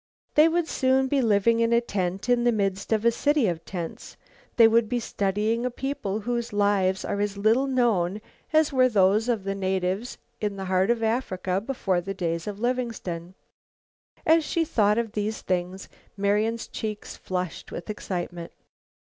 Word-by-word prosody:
They 305 +2 +6
would 335 0 0
soon 265 -2 +2
be 275 0 +1
living 230 0 +3
in 230 0 +2
a 235 - +5
tent 195 -3 -3
in 245 -1 +3
the 240 - +4
midst 195 -2 -1
of 220 0 +1
a 235 - +6
city 290 +2 +2
of 170 -2 -2
tents. 175 -3 -7 0.4
They 230 -2 +8
would 225 -1 +3
be 245 0 0
studying 215 +2 -1
a 250 - 0
people 240 -5 -3
whose 240 +1 -2
lives 200 -2 +1
are 200 - -2
as 205 -1 -2
little 225 +7 +3
known 215 -8 +1 0.3
as 310 -2 +3
were 255 -1 +4
those 210 +2 +3
of 225 -5 0
the 195 0 -2
natives 190 +3 -2 0.2
in 205 -2 -2
the 190 - -4
heart 185 +2 +1
of 235 -1 +1
Africa 190 -5 -1
before 195 -8 -1
the 195 +3 -5
days 170 -2 -2
of 205 -1 -5
Livingstone. 225 -8 -3 0.9
As 325 0 +5
she 330 +2 0
thought 210 -6 +2
of 230 -2 -1
these 215 +1 -3
things 185 +1 -2 0.3
Marian's 210 +3 0
cheeks 215 -1 -5
flushed 180 -2 -5
with - - -7
excitement. 175 -5 -5
210 Hz, 170 wpm, -26 LUFS, 190-240 Hz, 0.9 s, They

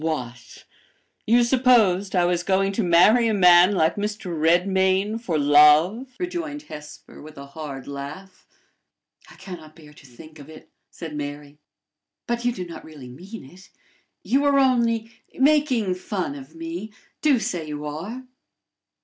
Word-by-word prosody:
"What! 125 -7 -6 0.6
you 240 +2 +4
supposed 230 -7 +2
I 175 -1 +3
was 175 0 0
going 195 +2 +1
to 200 - -2
marry 190 +7 +4
a 220 - 0
man 180 +1 +6
like 160 0 +1
Mr. 205 -4 -4
Redmain 190 +6 +1
for 175 -9 -2
love?" 150 - +4
rejoined 335 -5 -5
Hesper, 150 - -12
with 155 0 -13
a 140 - -9
hard 140 -2 -9
laugh. 145 +7 -9 0.8
"I - - -15
can 185 -3 -9
not 155 -1 -16
bear 150 -3 -16
to 145 - -18
think 155 +5 -15
of 145 +1 -13
it!" 160 - -14 0.2
said 160 -3 -9
Mary. 145 0 -7 0.7
"But 235 0 -3
you 245 - +2
do 185 -6 -6
not 170 - -10
really 145 -5 -12
mean 185 - -11
it! 180 +8 -17 0.5
You 275 +3 +1
are 285 -1 +3
only 235 -4 +1 0.2
making 265 -8 +2
fun 185 -4 -4
of 140 +3 -12
me! 165 +6 -7 0.3
Do 295 -4 +3
say 170 -7 -4
you 150 0 -6
are." 180 - -6
180 Hz, 155 wpm, -23 LUFS, 150-225 Hz, 0.8 s, man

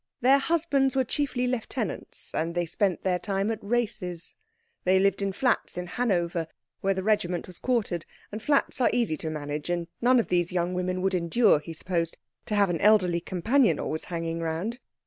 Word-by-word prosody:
Their 265 +3 +6
husbands 280 -4 +1
were 265 - +3
chiefly 255 -1 -1
lieutenants, 245 -3 -4
and 165 +2 -1
they 175 0 +1
spent 185 +2 0
their 180 -1 +1
time 195 +2 -1
at 220 - -3
races. 205 -6 -2 0.5
They 185 +1 +4
lived 195 +1 +2
in 200 0 0
flats 240 -2 0
in 180 - -3
Hanover, 175 -6 0 0.3
where 195 0 +1
the 190 - -2
regiment 180 -5 +1
was 180 -2 -10
quartered, 215 -10 -1 0.2
and 215 +1 -5
flats 285 0 +1
are - - +5
easy 235 -10 +1
to 160 - -4
manage, 150 0 -4
and 175 -1 -1 0.2
none 250 +1 +5
of 230 - -1
these 175 -1 +1
young 180 0 0
women 185 0 -1
would 190 0 +1
endure, 180 +2 +3
he 150 - -9
supposed, 165 0 -2 0.3
to 210 - -1
have 200 -3 +3
an 165 - -2
elderly 190 -5 +4
companion 185 - +2
always 155 - -3
hanging 165 -1 -3
round. 165 +9 -3
190 Hz, 185 wpm, -27 LUFS, 170-235 Hz, 0.5 s, Their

